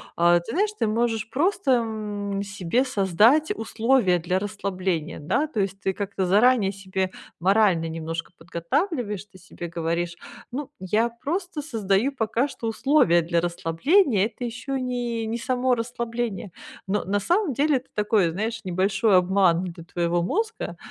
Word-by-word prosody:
А, 175 Hz, 0 st, +5 dB
ты 195 Hz, +7 st, -8 dB
знаешь, 410 Hz, +4 st, +2 dB
ты -, -, +2 dB
можешь 225 Hz, 0 st, 0 dB
просто, 325 Hz, -, +1 dB
м, 210 Hz, -4 st, -1 dB
себе 200 Hz, +5 st, 0 dB
создать 225 Hz, -, +3 dB
условия 225 Hz, -3 st, +2 dB
для 180 Hz, +3 st, 0 dB
расслабления, 190 Hz, -5 st, -3 dB
да? 220 Hz, -, 0 dB
То 265 Hz, -8 st, -4 dB
есть 195 Hz, 0 st, -2 dB
ты 190 Hz, -, +1 dB
как-то 200 Hz, -1 st, -2 dB
заранее 210 Hz, +1 st, +4 dB
себе 190 Hz, -1 st, -3 dB, 0.3 s
морально 190 Hz, -3 st, +3 dB
немножко 165 Hz, 0 st, -5 dB
подготавливаешь, 205 Hz, -, -2 dB
ты 190 Hz, -2 st, -18 dB
себе 175 Hz, -1 st, -8 dB
говоришь: 170 Hz, +1 st, -2 dB, 0.4 s
"Ну, 280 Hz, +2 st, -4 dB
я 210 Hz, +6 st, +1 dB
просто 315 Hz, +7 st, -4 dB
создаю 220 Hz, -2 st, +1 dB
пока 235 Hz, +1 st, 0 dB
что 230 Hz, -5 st, -6 dB
условия 225 Hz, -, +3 dB
для 170 Hz, +1 st, +1 dB
расслабления. 195 Hz, -, +2 dB
Это 245 Hz, +2 st, -7 dB
ещё 250 Hz, +4 st, -4 dB
не 245 Hz, -3 st, -2 dB
не 225 Hz, +2 st, -3 dB
само 255 Hz, +1 st, +1 dB
расслабление". 235 Hz, -3 st, -3 dB, 0.3 s
Но 200 Hz, +2 st, -1 dB
на 205 Hz, +2 st, 0 dB
самом 350 Hz, -, +1 dB
деле 285 Hz, +2 st, +2 dB
это 255 Hz, -, -10 dB
такой, 210 Hz, -3 st, +2 dB
знаешь, 220 Hz, +5 st, -3 dB
небольшой 195 Hz, +3 st, +2 dB
обман 180 Hz, -1 st, +3 dB
для 170 Hz, -2 st, -7 dB
твоего 175 Hz, 0 st, 0 dB
мозга. 440 Hz, -, -2 dB
210 Hz, 150 wpm, -24 LUFS, 185-245 Hz, 0.4 s, А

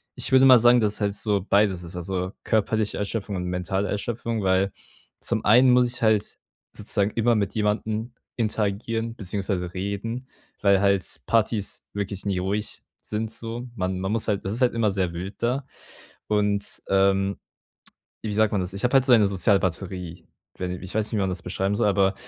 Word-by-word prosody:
ich -, -, -5 dB
würde 130 Hz, 0 st, +7 dB
mal 130 Hz, -3 st, +9 dB
sagen, 120 Hz, +1 st, +6 dB
dass 105 Hz, -1 st, +1 dB
es -, -, -8 dB
halt 100 Hz, 0 st, 0 dB
so 100 Hz, -2 st, 0 dB
beides 100 Hz, -3 st, +3 dB
ist, 85 Hz, +1 st, -8 dB
also 90 Hz, +1 st, -3 dB
körperliche 110 Hz, -1 st, 0 dB
Erschöpfung 105 Hz, 0 st, -3 dB
und 90 Hz, -1 st, -3 dB
mentale 90 Hz, +2 st, -1 dB
Erschöpfung, 115 Hz, +1 st, -3 dB
weil 95 Hz, +1 st, +2 dB, 0.5 s
zum 115 Hz, -2 st, -1 dB
einen 125 Hz, +4 st, +6 dB
muss 125 Hz, 0 st, +5 dB
ich 120 Hz, -, -4 dB
halt 110 Hz, -1 st, +2 dB, 0.4 s
sozusagen 100 Hz, +1 st, -1 dB
immer 115 Hz, +1 st, +2 dB
mit 100 Hz, -1 st, -1 dB
jemandem 110 Hz, +2 st, -1 dB, 0.2 s
interagieren, 115 Hz, +1 st, -1 dB
beziehungsweise 95 Hz, -2 st, -3 dB
reden, 100 Hz, +7 st, -4 dB, 0.3 s
weil 100 Hz, -1 st, +4 dB
halt 100 Hz, -2 st, +2 dB, 0.2 s
Partys 110 Hz, -2 st, 0 dB
wirklich 100 Hz, -1 st, -4 dB
nie 100 Hz, -2 st, 0 dB
ruhig 100 Hz, +3 st, -3 dB, 0.2 s
sind 110 Hz, +1 st, -3 dB
so. 115 Hz, +2 st, -6 dB
Man 95 Hz, -2 st, -2 dB
man 95 Hz, +2 st, -2 dB
muss 115 Hz, 0 st, -1 dB
halt 100 Hz, -2 st, -1 dB
das 95 Hz, -, -2 dB
ist 120 Hz, -, -4 dB
halt 125 Hz, -, +3 dB
immer 110 Hz, -3 st, +2 dB
sehr 95 Hz, -3 st, -1 dB
wild 90 Hz, +4 st, -6 dB
da. 130 Hz, +3 st, 0 dB, 0.6 s
Und, 105 Hz, -1 st, 0 dB
ähm, 95 Hz, 0 st, +2 dB, 0.8 s
wie 105 Hz, -2 st, -3 dB
sagt 110 Hz, 0 st, +3 dB
man 100 Hz, -, +1 dB
das? 90 Hz, +1 st, -4 dB
Ich 100 Hz, -, -6 dB
habe 125 Hz, -, +1 dB
halt 135 Hz, -1 st, +5 dB
so 130 Hz, -, +3 dB
eine 105 Hz, -4 st, +6 dB
Sozialbatterie, 95 Hz, -3 st, -1 dB
i -, -, -33 dB, 0.3 s
wei 90 Hz, -, -3 dB
ni 90 Hz, -, -3 dB
ich 95 Hz, +3 st, -9 dB
weiß 110 Hz, -1 st, +1 dB
nicht, -, -, -10 dB
wie 105 Hz, -, +1 dB
man 95 Hz, -, +1 dB
das 90 Hz, -1 st, -4 dB
beschreiben 95 Hz, +2 st, -1 dB
soll, 105 Hz, -, +2 dB
aber 100 Hz, -1 st, +3 dB
100 Hz, 195 wpm, -25 LUFS, 95-110 Hz, 0.8 s, mal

